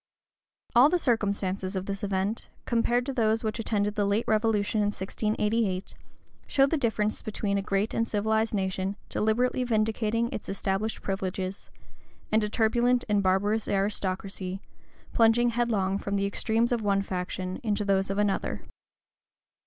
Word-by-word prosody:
All 250 +5 +8
the 360 - +3
circumstances 200 - -1
of 190 0 -2
this 200 0 -4
event, 200 +2 -2 0.2
compared 240 +1 +1
to 275 - -3
those 225 -2 +1
which 220 +1 -2
attended 210 -2 0
the 210 - 0
late 205 +3 +1
revolution 215 -1 +1
in 205 - +2
1688, 210 0 -1 0.5
show 270 - +4
the 280 - 0
difference 220 -6 0
between 205 -1 -2
a - - -1
great 195 +2 -1
and 230 - 0
civilized 220 +1 +1
nation, 190 0 -1
deliberately 245 +4 +1
vindicating 225 0 0
its - - -6
established 195 +2 -2
privileges, 190 0 -3 0.6
and 215 0 +3
a 210 - -1
turbulent 240 +3 +2
and 205 -2 +2
barbarous 205 +3 +1
aristocracy, 195 -1 -2 0.5
plunging 235 +1 +4
headlong 210 -5 0
from 200 0 -3
the 200 0 +1
extremes 225 +4 0
of 240 -2 +1
one 200 -1 +1
faction 185 0 -4
into 210 -3 -1
those 195 -1 +1
of 195 - -2
another. 205 -1 0
210 Hz, 145 wpm, -28 LUFS, 195-225 Hz, 0.6 s, All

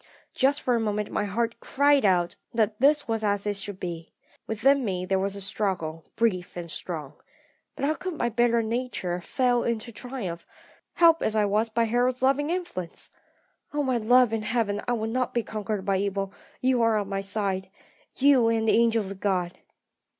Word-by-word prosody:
"Just 280 +2 +2
for 250 - +2
a 235 - +2
moment 210 -1 -2
my - - 0
heart 230 +3 -2
cried 285 -1 +3
out 175 -3 +2 0.2
that 215 -1 +1
this 290 +2 +4
was 225 -1 -1
as 205 -1 0
it 205 -1 -1
should 200 -1 -6
be. 170 -2 -6 0.4
Within 270 +5 +3
me 185 -4 -2
there 190 +1 +1
was 195 +1 -2
a 200 - -2
struggle, 175 -6 -2
brief 185 -7 0
and 170 -2 -6
strong. 155 -6 -5 0.6
But - - -2
how 305 - +2
could 365 +1 -5
my 240 - 0
better 235 0 +2
nature 220 -6 -2
fail 245 +5 +1
to 235 0 -2
triumph, 210 -8 -6 0.5
helped 330 -1 +5
as 220 - 0
I 210 -1 +3
was 210 +3 +1
by 230 +1 +1
Harold's 245 +3 +1
loving 275 +3 +2
influence? 340 - -4 0.6
Oh, 295 - +1
my 260 -3 +1
love 245 +1 +4
in 225 - 0
heaven, 215 -2 -1
I 245 - +1
will 220 -2 -1
not 245 +3 -1
be 235 - +1
conquered 210 -2 -4
by 195 -1 +2
evil; 195 0 -2 0.3
you 255 -1 +2
are 225 -1 +3
on 205 -2 -2
my 195 0 -2
side 195 -1 -2 0.5
you, 265 -4 +5
and 225 -1 +1
the - - +4
angels 225 -4 +2
of 195 - -8
God! 185 -3 -1
220 Hz, 190 wpm, -26 LUFS, 195-245 Hz, 0.6 s, helped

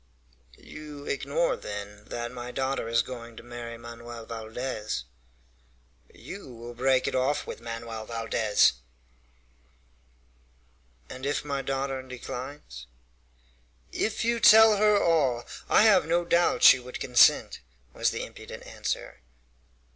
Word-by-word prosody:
"You 150 -2 -10
ignore, - - 0
then, 105 0 -8
that 120 0 -5
my 125 -1 -7
daughter 130 -2 -2
is 115 0 +2
going 120 -2 -9
to - - -10
marry 120 -1 -8
Manoel 115 0 -9
Valdez?" 110 - -4 1.1
"You 195 -9 -10
will 120 +1 -9
break 130 +2 +2
it - - -1
off 130 +3 0
with - - -8
Manoel 115 -1 -6
Valdez!" 115 -2 +2 2.3
"And 130 +1 -10
if 145 +1 -1
my 140 -1 -2
daughter 135 0 -2
declines?" 125 - -8 1.0
"If 220 +1 -1
you 235 0 +1
tell 220 -1 +8
her 210 0 +4
all, 140 -10 +2 0.2
I - - +6
have 200 -7 +5
no 170 +1 +1
doubt 170 0 +2
she - - +9
would 125 0 -8
consent," 125 -1 +4 0.3
was - - +1
the - - -4
impudent - - -11
answer. - - -5
125 Hz, 125 wpm, -27 LUFS, 115-145 Hz, 2.3 s, she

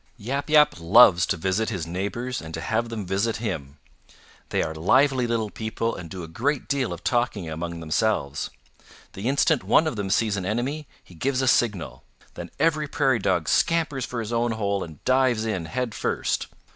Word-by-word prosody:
"Yap 135 +7 -3
Yap 150 - +5
loves 85 -1 +6
to - - 0
visit 95 +6 0
his 95 -8 -3
neighbors 100 +9 -3
and 80 0 -7
to - - -5
have 115 +1 -1
them 110 -3 -5
visit 100 +5 0
him. 75 - -5 0.7
They - - +1
are 80 - -3
lively 125 - +3
little 115 -3 -1
people 115 +1 -3
and 85 -2 -8
do 90 0 -7
a - - -7
great 125 - -1
deal 140 -3 0
of - - -7
talking 120 -7 0
among 85 +1 -5
themselves. 80 -4 -1 0.6
The 100 +5 -5
instant 140 +1 +2
one 160 - +4
of 155 -8 -2
them 100 -2 -3
sees 105 0 +1
an 95 - -3
enemy 135 +8 -2 0.2
he - - -17
gives 130 +9 -1
a - - 0
signal. 105 -9 +1 0.3
Then - - -8
every 155 -2 +1
Prairie 135 -4 +1
Dog - - 0
scampers 160 -6 +1
for 120 -1 -4
his 115 +1 -5
own 120 0 +1
hole 100 -3 -1
and 80 -3 -11
dives 130 -4 +2
in 95 -7 -2
head 125 +4 -3
first. - - -1
110 Hz, 190 wpm, -25 LUFS, 95-130 Hz, 0.7 s, loves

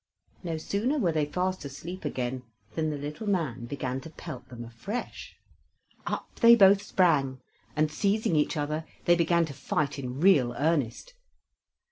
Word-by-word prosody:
No 165 -3 -3
sooner 215 - -1
were 185 - +2
they 155 -2 0
fast 185 +4 -2
asleep 160 +7 -7
again, 125 0 -2 0.3
than 155 -1 -1
the 150 - -3
little 150 +9 -6
man 150 -11 -1
began 130 0 -3
to 160 - -9
pelt 155 -5 -9
them 120 -2 -8
afresh. 120 - -6 0.7
Up - - -4
they 235 -1 +9
both 200 -2 +6
sprang, 150 -11 +2 0.4
and 155 0 +2
seizing 200 +2 +1
each 150 +1 +1
other, 150 +2 -2 0.2
they 175 - +6
began 170 0 +3
to 150 - -8
fight 140 +1 -2
in 130 0 -5
real 150 -9 +4
earnest. 155 - 0
155 Hz, 155 wpm, -28 LUFS, 135-185 Hz, 0.7 s, they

